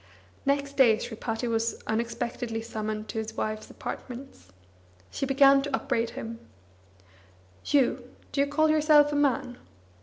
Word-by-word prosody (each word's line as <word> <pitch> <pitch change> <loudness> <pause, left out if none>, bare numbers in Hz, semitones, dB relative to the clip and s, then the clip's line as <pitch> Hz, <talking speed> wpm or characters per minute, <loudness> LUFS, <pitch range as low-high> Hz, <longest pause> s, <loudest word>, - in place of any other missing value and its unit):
Next 280 0 0
day 235 -5 +6
Sripati 225 +1 -4
was 230 0 -1
unexpectedly 230 0 -2
summoned 215 -1 -4
to 220 - -3
his 220 0 -6
wife's 215 0 -3
apartments. 255 - -8 0.6
She 275 - -2
began 275 0 +6
to 280 -1 -1
upbraid 240 -4 -1
him: 230 0 -6 1.3
"You, 275 -4 +1 0.2
do 280 - +1
you 280 - +2
call 310 +2 +2
yourself 300 -1 +5
a - - -1
man? 270 -3 0
245 Hz, 130 wpm, -27 LUFS, 225-280 Hz, 1.3 s, day